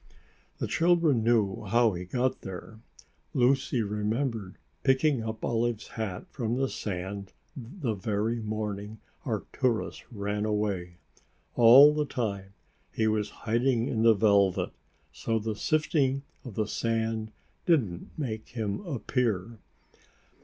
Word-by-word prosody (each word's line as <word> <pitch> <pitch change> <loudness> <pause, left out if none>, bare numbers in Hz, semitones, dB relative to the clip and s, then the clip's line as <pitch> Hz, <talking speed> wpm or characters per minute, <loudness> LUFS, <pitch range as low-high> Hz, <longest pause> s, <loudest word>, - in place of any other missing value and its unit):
The - - -2
children 165 -8 +3
knew 110 -5 +2
how 115 +2 +3
he 90 +1 -5
got 125 +7 -1
there. 95 +4 -8 0.6
Lucy 130 -1 +2
remembered 105 0 -2 0.2
picking 135 -1 +3
up 110 -1 -4
Olive's 115 -1 -1
hat 110 -6 -4
from 120 -3 -2
the 135 +1 0
sand 100 0 -5 0.2
the 130 - -4
very 105 +3 -1
morning 105 0 -4 0.3
Arcturus 120 -4 -1
ran 105 -1 -2
away. 100 -5 -1 0.6
All 130 +6 +9
the 150 0 0
time 100 -6 -3 0.4
he 110 - 0
was 110 -1 +1 0.2
hiding 120 +1 +2
in 110 - 0
the 115 -1 +6
velvet, 100 -3 +3 0.4
so 115 -1 -1
the 110 0 -2
sifting 140 0 +1 0.2
of 120 -7 -9
the 110 - +1
sand 110 0 -1 0.4
didn't 115 - +1
make 110 -8 -4
him 110 -4 -3
appear. 115 - -1
110 Hz, 120 wpm, -28 LUFS, 105-125 Hz, 0.6 s, All